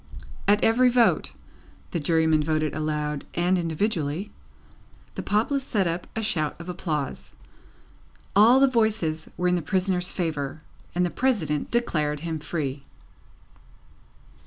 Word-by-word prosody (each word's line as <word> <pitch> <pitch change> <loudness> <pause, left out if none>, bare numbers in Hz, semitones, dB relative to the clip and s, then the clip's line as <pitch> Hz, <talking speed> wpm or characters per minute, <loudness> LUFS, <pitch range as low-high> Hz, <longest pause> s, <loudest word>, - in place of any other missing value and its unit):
At 205 +1 +4
every 250 +3 +5
vote 240 -1 +2 0.6
(the 170 - -1
Jurymen 160 0 +2
voted 155 -1 0
aloud 150 -1 -2
and 175 +2 +2
individually), 170 0 -1 0.8
the - - -4
populace 235 +7 0
set 210 -7 0
up 170 +1 -2
a 225 - -2
shout 155 -8 -1
of 170 - -9
applause. 150 - -4 1.0
All 230 +6 +7
the 275 - +7
voices 220 -10 0
were 180 - +1
in - - +2
the 175 - +1
prisoner's 180 +2 0
favour, 155 -4 -3 0.3
and 180 0 +2
the 175 - -2
President 220 - 0
declared 150 -11 0
him 165 -1 -3
free. 145 -3 -4
170 Hz, 130 wpm, -25 LUFS, 155-210 Hz, 1.0 s, All